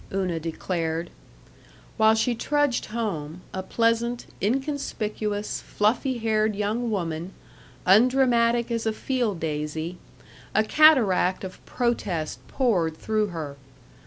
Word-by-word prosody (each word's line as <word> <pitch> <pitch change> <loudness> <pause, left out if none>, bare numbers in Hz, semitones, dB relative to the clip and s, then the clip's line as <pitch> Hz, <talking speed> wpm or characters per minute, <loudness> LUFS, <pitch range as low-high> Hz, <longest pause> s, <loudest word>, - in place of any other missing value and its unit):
Una 185 -4 -1
declared. 165 0 -3 0.8
While 220 0 +5
she 230 +2 +1
trudged 290 +2 0
home 180 -8 -4
a 190 - -2
pleasant, 230 +3 0 0.2
inconspicuous, 215 -4 -2
fluffy 245 +5 0
haired 215 -2 +1
young 215 +4 -1
woman, 170 -3 -3 0.5
undramatic 235 +2 +4
as 230 -1 -1
a 220 - +1
field 235 -6 -1
daisy 155 +2 -3 0.6
a 215 - +5
cataract 220 - +4
of 185 -1 -8
protest 200 -10 -1
poured 180 - +1
through 215 +2 0
her. 155 -6 -6
215 Hz, 105 wpm, -25 LUFS, 180-235 Hz, 0.8 s, While